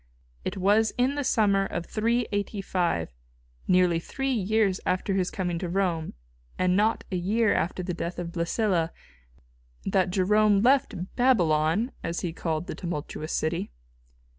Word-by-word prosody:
It - - -3
was 205 +4 +3
in 255 +3 +2
the 290 0 -2
summer 205 -6 +3
of 175 - -4
385, 205 - -1 0.5
nearly 180 -2 +4
three 270 +10 -3
years 210 -3 +1
after 185 +2 0
his 185 -2 +1
coming 175 -3 -2
to 180 - -3
Rome, 175 - -1 0.4
and 185 0 +2
not 215 +3 +2
a - - -1
year 210 +5 +2
after 180 +2 -1
the 180 0 -3
death 170 +1 -4
of 175 -1 -4
Blæsilla, 170 0 0 1.0
that 190 -1 +2
Jerome 205 +2 +3
left 245 -8 +1
"Babylon," 190 - +2
as 170 +1 -3
he 170 -2 -3
called 160 -1 -2
the - - -5
tumultuous 155 -3 -5
city. 165 +2 -1
185 Hz, 140 wpm, -27 LUFS, 170-215 Hz, 1.0 s, nearly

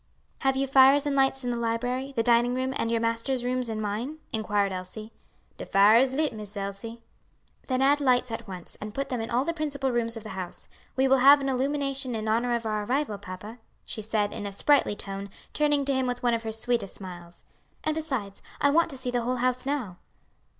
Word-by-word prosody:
"Have 270 0 +1
you 270 - +1
fires 270 +2 +6
and 285 -1 0
lights 270 0 +2
in 245 - -1
the 240 - -2
library, 245 +4 -2
the 230 - +1
dining 240 +1 +3
room, 260 +1 -1
and 230 - -1
your 230 - +2
master's 230 +2 -1
rooms 250 -1 -1
and 220 -1 -3
mine?" 215 +8 -3 0.2
inquired 205 -2 0
Elsie. 200 +4 -7 0.5
"De - - -5
fires 220 +7 +5
is - - -3
lit, 310 -1 +1
Miss 210 -1 -9
Elsie." 200 +4 -6 0.6
"Then 255 0 +1
add 285 +2 +4
the 285 - -3
lights 250 -1 +3
at 225 0 -5
once, 180 -3 -8
and 210 0 -7
put 275 0 -2
them 250 -3 -2
in 225 - -5
all 250 +3 +1
the 335 - -1
principal 285 -4 -2
rooms 230 -1 +2
of 225 - -8
the 215 - -8
house. 185 -3 -7 0.3
We 265 +1 +3
will 270 0 +5
have 280 +3 +8
an 275 -1 -2
illumination 270 -1 -1
in 220 0 -3
honor 235 +2 +1
of 235 -1 -3
our 215 -1 -1
arrival, 250 -2 -1
papa," 200 +5 -9 0.3
she 220 - -5
said, 210 -1 -1
in 205 - -5
a - - -5
sprightly 275 0 +3
tone, 200 -1 -6 0.2
turning 295 -2 +2
to 275 - +1
him 260 -1 0
with 245 0 -3
one 240 -1 +3
of 230 - 0
her 225 -1 -4
sweetest 225 -2 -1
smiles, 175 -3 -8 0.4
"and 310 - 0
besides, 265 -11 -4 0.2
I 285 - +4
want 335 +3 +3
to 275 - -7
see 255 -1 -3
the 245 -1 0
whole 250 +2 -1
house 255 +1 0
now." 250 -11 -2
245 Hz, 225 wpm, -27 LUFS, 215-270 Hz, 0.6 s, have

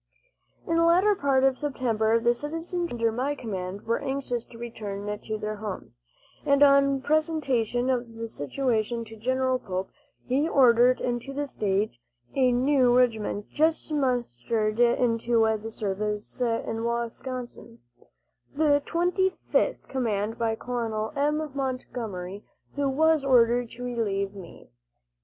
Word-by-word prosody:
In 330 - 0
the 335 - +4
latter 360 +5 +5
part 275 -7 +2
of 270 -1 +3
September 230 -6 +1
the 240 +1 +3
citizen 330 +6 -3
troops - - -8
under 230 -1 +1
my 260 +6 -1
command 195 -5 -5
were 230 +1 0
anxious 265 -3 -3
to 230 - -14
return 210 -4 -6
to 215 -1 -4
their 215 0 -4
homes, 200 - -7 0.4
and 280 0 +4
on 275 -1 +5
presentation 280 -6 +1
of 240 -2 -2
the 230 0 -5
situation 230 - -1
to 225 - -11
General 255 +3 0
Pope, 190 -4 -4 0.3
he 280 +6 +1
ordered 250 -3 +5
into 245 +2 -3
the 290 +1 -2
state 205 - -1 0.3
a 255 -2 +3
new 250 0 +3
regiment 220 -4 0
just 315 0 +1
mustered 230 - -1
into 235 -1 +2 0.2
the 225 - -6
service 210 +1 -3
in 230 -1 -1
Wisconsin 235 0 -4 0.8
the 290 -1 +3
Twenty 360 +2 +1 0.2
fifth - - +1
commanded 225 -4 -2
by 225 -1 +1
Col. 225 -2 -3
M. 300 +1 0
Montgomery, 225 -8 -4 0.3
who 285 -1 0
was 315 +2 +3
ordered 245 -2 +4
to 245 +2 -9
relieve 205 -5 -2
me. 185 - -12
240 Hz, 135 wpm, -26 LUFS, 220-275 Hz, 0.8 s, latter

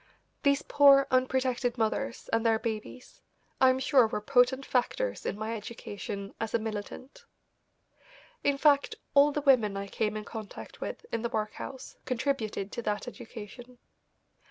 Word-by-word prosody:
These 280 -1 +2
poor, 280 -1 +6
unprotected 255 -1 +1
mothers 235 +3 -2
and 225 0 +2
their 225 -1 +3
babies 220 +2 -6 0.4
I 260 - +7
am 255 - +3
sure 260 -2 +4
were 215 - -3
potent 255 +3 +3
factors - - -1
in - - -2
my 220 +2 -3
education 205 -2 -7
as 225 0 -2
a - - +5
militant. 225 - -7 1.2
In 285 -1 +2
fact, 285 -1 +3 0.2
all 285 +1 +6
the 295 - -2
women 235 -8 +3
I 200 - -3
came 215 +1 -2
in 210 - -6
contact 220 -3 -9
with - - -5
in 230 - -1
the 235 - -2
workhouse 220 +4 -5
contributed 235 -6 -2
to - - -4
that 210 +1 -2
education. 245 0 -10
245 Hz, 150 wpm, -29 LUFS, 215-270 Hz, 1.2 s, I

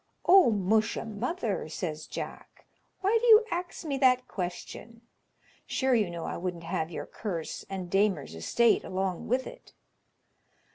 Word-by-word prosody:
"O 370 -5 +7
musha, 215 +2 +1
mother," 220 - -3
says 155 -1 -5
Jack, - - -8 0.4
"why 415 +4 +3
do 485 - +1
you 440 -1 +8
ax 350 -1 -4
me 280 -3 -2
that 255 -1 +4
question? 200 +5 -6 0.7
sure 265 -1 +1
you 215 -6 +2
know 170 -1 -5
I - - -4
wouldn't 175 -1 -4
have 165 -1 -2
your 170 - -5
curse 170 -7 -5
and 190 -2 -4
Damer's 195 - +1
estate 155 - +2
along 185 -1 -3
with 255 +3 +1
it." - - -12
210 Hz, 145 wpm, -29 LUFS, 175-260 Hz, 0.7 s, you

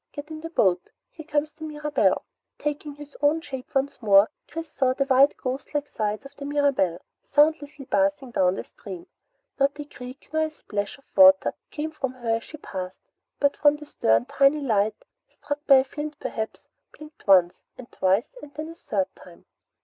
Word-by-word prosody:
Get 290 +2 -8
in 310 0 -7
the 330 - -6
boat. 185 - +2 0.2
Here 315 -2 -11
comes 300 0 0
the 315 - -12
Mirabelle." 300 -1 +1 0.3
Taking 295 0 -4
his 290 0 -12
own 295 +2 +3
shape 275 -2 -8
once 270 -1 0
more, 200 -1 +6 0.2
Chris 330 +1 -6
saw 265 -3 +1
the 275 - +1
white 270 +1 +5
ghost 265 +3 -5
like 290 0 0
sides 215 +1 -3
of 275 +1 -12
the 280 - -7
Mirabelle 280 - +1 0.3
soundlessly 295 -1 +2
passing 290 -1 0
down 185 -4 +1
stream. 185 -4 -10 0.5
Not 280 +2 +2
a 295 - -4
creak 255 0 -11
nor 315 0 +2
a - - -4
splash 205 -9 -5
of 275 - -24
water 285 0 +7 0.2
came 310 +1 -4
from 265 -4 -3
her 235 -3 -1
as 230 - -10
she 310 - -10
passed, 185 -9 -7 0.4
but 285 -1 +2
from 290 0 +4
the 300 0 -10
stern 115 - +2
a - - -19
tiny 275 - +3
light, 215 -5 +1 0.3
struck 290 0 -5
by 275 - +9
a 265 - +6
flint 295 +2 -6
perhaps, 220 -1 -5 0.3
blinked 305 -4 -14
once, 180 -3 +5 0.2
and 250 -2 -11
twice, 195 - +1
and 290 - -11
then 310 +1 -5
a 330 - -10
third 200 - -1
time. 175 -2 -16
280 Hz, 190 wpm, -25 LUFS, 225-295 Hz, 0.5 s, by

